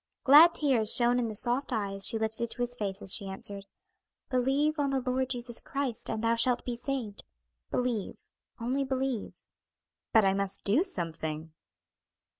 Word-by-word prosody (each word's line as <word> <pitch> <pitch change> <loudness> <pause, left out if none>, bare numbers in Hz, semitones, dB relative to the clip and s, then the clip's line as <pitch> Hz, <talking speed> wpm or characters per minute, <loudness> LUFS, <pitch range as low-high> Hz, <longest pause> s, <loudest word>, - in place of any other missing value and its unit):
Glad 310 +5 +8
tears 250 -8 +2
shone 245 0 +3
in 240 - 0
the 215 - -5
soft 245 +6 -1
eyes 200 -4 0
she 225 - +3
lifted 220 +1 -2
to 245 - -3
his 245 0 -3
face 200 -3 -4
as 190 - -6
she 200 -3 -3
answered, 195 +1 -7 0.6
"'Believe 275 +5 +1
on 285 -1 +1
the 270 -1 0
Lord 260 0 -1
Jesus 240 -2 -4
Christ 275 -4 -4
and 220 0 -3
thou 230 0 +3
shalt 240 +1 +2
be 245 - -3
saved.' 240 -4 -4 0.5
Believe, 245 -5 -2 0.4
'only 255 +4 -1
believe.'" 265 -3 -3 0.7
"But 220 -3 +5
I 190 - +3
must 195 0 -1
do 215 +10 +3
something?" 160 - -2
240 Hz, 165 wpm, -29 LUFS, 205-265 Hz, 0.7 s, Glad